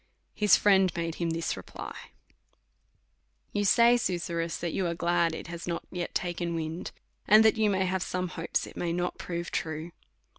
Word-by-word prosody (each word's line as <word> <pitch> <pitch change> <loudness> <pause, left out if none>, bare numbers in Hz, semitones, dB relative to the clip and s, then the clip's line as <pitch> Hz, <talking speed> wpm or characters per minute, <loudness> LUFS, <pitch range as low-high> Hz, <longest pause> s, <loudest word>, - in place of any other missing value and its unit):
His 210 -2 +5
friend 190 -3 +4
made 165 -1 -2
him 170 - +1
this 165 0 -1
reply: - - -8 1.6
You 205 - +1
say, 235 +5 +6
Susurrus, 170 -5 -2
that 170 -2 -3
you 185 - 0
are 170 - -2
glad 170 -1 +1
it - - -7
has 170 +1 -7
not 170 -1 -2
yet 180 -1 -4
taken 175 -1 -2
wind; 160 +1 -4 0.4
and 215 +2 +7
that 220 - +5
you 215 -2 +2
have 190 -1 0
some 180 0 -2
hopes 165 -1 -2
it - - -12
may 170 -1 -2
not 180 +1 -2
prove 170 0 -4
true. 160 +1 -3
175 Hz, 175 wpm, -28 LUFS, 170-190 Hz, 1.6 s, and